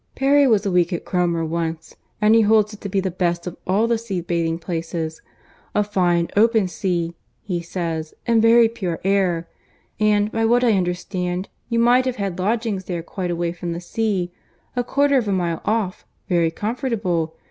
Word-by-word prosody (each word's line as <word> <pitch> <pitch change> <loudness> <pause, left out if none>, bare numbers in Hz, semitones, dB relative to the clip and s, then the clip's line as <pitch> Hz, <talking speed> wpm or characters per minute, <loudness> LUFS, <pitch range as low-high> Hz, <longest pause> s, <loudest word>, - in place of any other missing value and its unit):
—Perry 280 +1 +4
was 215 -4 +3
a 195 - 0
week 175 -1 +2
at 175 - -3
Cromer 170 -2 0
once, 165 0 -3 0.2
and 210 +1 +4
he 225 - +6
holds 215 0 +3
it 210 - -12
to 200 - -5
be 195 0 +1
the 190 -1 -1
best 175 -1 -1
of 180 -1 -5
all 200 +5 +3
the 230 -1 +1
sea 205 -5 -3
bathing 165 -1 -1
places. 165 -1 -4 0.5
A 210 - +4
fine 175 -4 +1
open 220 -1 +4
sea, 175 -2 -2 0.3
he 180 -4 -2
says, 165 -2 -4
and 230 -2 +3
very 230 +1 +6
pure 185 -7 -4
air. 185 -4 +1 0.5
And, 210 0 +2
by 225 -1 0
what 240 +2 +3
I 240 - +4
understand, 180 0 -2 0.2
you 235 - 0
might 245 +2 +4
have 255 -1 -1
had 195 -4 -3
lodgings 210 -1 -1
there 175 -3 -4
quite 180 +1 -4
away 170 0 -1
from 175 -1 -4
the 170 - -4
sea—a 200 +4 -3
quarter 280 +2 +3
of 225 - -3
a - - 0
mile 175 -3 -1
off—very 185 -5 -1
comfortable. 205 - -2
190 Hz, 180 wpm, -22 LUFS, 170-225 Hz, 0.5 s, he